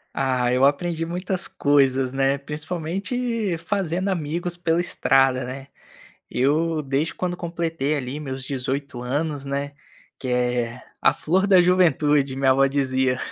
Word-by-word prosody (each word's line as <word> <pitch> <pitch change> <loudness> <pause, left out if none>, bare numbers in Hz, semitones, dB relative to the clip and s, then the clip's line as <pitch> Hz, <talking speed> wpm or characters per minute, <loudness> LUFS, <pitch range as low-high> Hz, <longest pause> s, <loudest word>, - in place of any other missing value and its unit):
Ah, 125 -2 +1
eu 130 +1 +2
aprendi 165 +4 +1
muitas 180 +2 -1
coisas, 135 -2 +2
né, 135 +1 +2
principalmente 180 - -3
fazendo 185 +1 -1
amigos 175 0 -2
pela 170 -1 0
estrada, 135 -6 +3
né. 135 +2 -7 0.6
Eu, 155 +5 +1
desde 140 +4 -1
quando 180 -1 -3
completei, 165 -4 -2
ali, 135 +1 -4
meus 135 -3 -5
18 135 -1 -4
anos, 145 +3 -2
né, 140 +1 -3 0.5
que 130 - -6
é 125 -1 -1 0.2
a - - +5
flor 190 +5 +1
da 190 -3 +6
juventude, 150 -6 +3
minha 135 -1 +3
vó 135 +1 +4
dizia. 130 -2 +1
145 Hz, 135 wpm, -23 LUFS, 135-170 Hz, 0.6 s, da